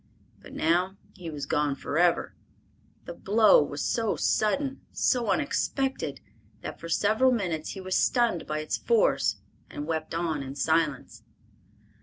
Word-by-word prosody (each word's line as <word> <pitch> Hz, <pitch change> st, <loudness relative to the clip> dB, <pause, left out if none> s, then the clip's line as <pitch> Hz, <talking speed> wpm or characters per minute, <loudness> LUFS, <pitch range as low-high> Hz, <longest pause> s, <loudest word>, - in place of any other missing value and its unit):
But -, -, -13 dB
now 180 Hz, +4 st, +1 dB, 0.2 s
he 180 Hz, -4 st, -8 dB
was 150 Hz, -3 st, -5 dB
gone 150 Hz, -2 st, 0 dB
forever. 170 Hz, +5 st, +1 dB, 0.7 s
The -, -, -6 dB
blow 210 Hz, -1 st, +5 dB
was 145 Hz, 0 st, -3 dB
so 225 Hz, -3 st, 0 dB
sudden, 270 Hz, +6 st, 0 dB
so 240 Hz, -4 st, +1 dB
unexpected, 270 Hz, -, -1 dB, 0.4 s
that -, -, -7 dB
for 165 Hz, -, -8 dB
several 220 Hz, +9 st, +3 dB
minutes 175 Hz, -10 st, -2 dB
he 195 Hz, -, -7 dB
was 185 Hz, 0 st, -2 dB
stunned 235 Hz, -9 st, +1 dB
by 155 Hz, 0 st, -2 dB
its 155 Hz, -, -2 dB
force 475 Hz, +2 st, +2 dB, 0.3 s
and 145 Hz, -, -6 dB
wept 160 Hz, 0 st, -3 dB
on 165 Hz, -3 st, -1 dB
in 135 Hz, 0 st, -7 dB
silence. 160 Hz, -2 st, 0 dB
175 Hz, 140 wpm, -27 LUFS, 155-225 Hz, 0.7 s, blow